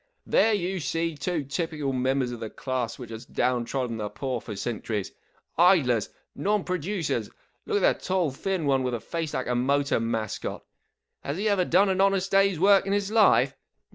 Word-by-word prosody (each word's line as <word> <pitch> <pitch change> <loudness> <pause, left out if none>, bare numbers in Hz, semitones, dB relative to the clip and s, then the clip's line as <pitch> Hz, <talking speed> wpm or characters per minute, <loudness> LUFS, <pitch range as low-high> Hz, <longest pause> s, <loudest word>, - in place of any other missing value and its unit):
44 - - -15
There 225 - +3
you 190 -1 -2
see 165 +1 -2
two 150 +2 -2
typical 145 -1 -3
members 130 0 0
of 120 - -6
the 110 -1 -5
class 130 -1 -3
which 120 -3 -9
has 110 +1 -7
down 125 -1 0
trodden 125 -3 -2
the 105 -1 -3
poor 130 -2 -3
for 105 - -7
cen¬ 110 +2 -3
turies. 105 -4 -3 0.5
Idlers! 140 - +4 0.2
Non 210 0 0
producers! 175 - -2 0.4
Look 205 - +1
at - - +3
the - - -19
tall, 180 -5 +1
thin 180 +4 -2
one 135 -2 +2
with 125 -1 -1
the - - -4
face 165 +4 -4
like 130 - -1
a 125 - -1
motor 140 +3 +1
mascot. 115 -2 -3 0.6
Has 140 +3 -3
he 210 +3 -1
ever 200 -3 +2
done 195 +4 +4
an 190 0 +1
honest 195 -1 +2
day's 195 -3 +3
work 195 +1 +5
in 195 - +1
his 205 0 -1
life 220 -1 +4
145 Hz, 200 wpm, -26 LUFS, 125-190 Hz, 0.6 s, work